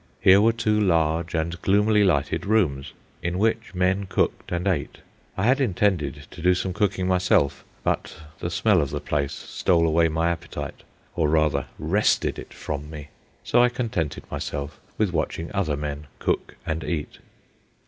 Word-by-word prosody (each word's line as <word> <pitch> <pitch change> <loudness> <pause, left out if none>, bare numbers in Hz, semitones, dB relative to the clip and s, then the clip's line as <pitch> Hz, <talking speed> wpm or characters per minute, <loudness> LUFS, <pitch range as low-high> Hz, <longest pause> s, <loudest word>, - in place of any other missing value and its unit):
Here 95 0 +6
were 115 +2 +5
two 110 -2 +1
large 85 -3 +1
and 85 +1 -2
gloomily 105 +2 +3
lighted 80 -8 +1
rooms, 85 -11 +1 0.3
in 90 +1 -2
which 110 0 0
men 95 +2 +1
cooked - - -1
and 90 +2 -1
ate. 85 -8 -1 0.4
I 95 - 0
had 130 +5 +3
intended 90 - 0
to 90 - -10
do 90 +1 +4
some 95 0 -2
cooking 100 -2 0
myself, 90 -7 +2 0.2
but - - -1 0.2
the 85 - -3
smell 95 0 +3
of 70 - -2
the - - -3
place 70 -2 -1
stole 85 -2 +1
away 80 +1 +3
my 80 +2 +1
appetite, 85 - -6 0.3
or, 80 -3 +2
rather, 75 -2 +2
wrested 85 +8 +1
it - - -10
from 75 0 -5
me; 75 -2 -9 0.3
so 120 - +3
I 125 - +5
contented 115 - -3
myself 70 +1 -4 0.2
with 105 -4 +1
watching 80 +1 -2
other 85 -8 0
men 75 0 -5
cook - - -2
and 80 0 -2
eat. 80 -4 -4
85 Hz, 165 wpm, -24 LUFS, 75-100 Hz, 0.4 s, Here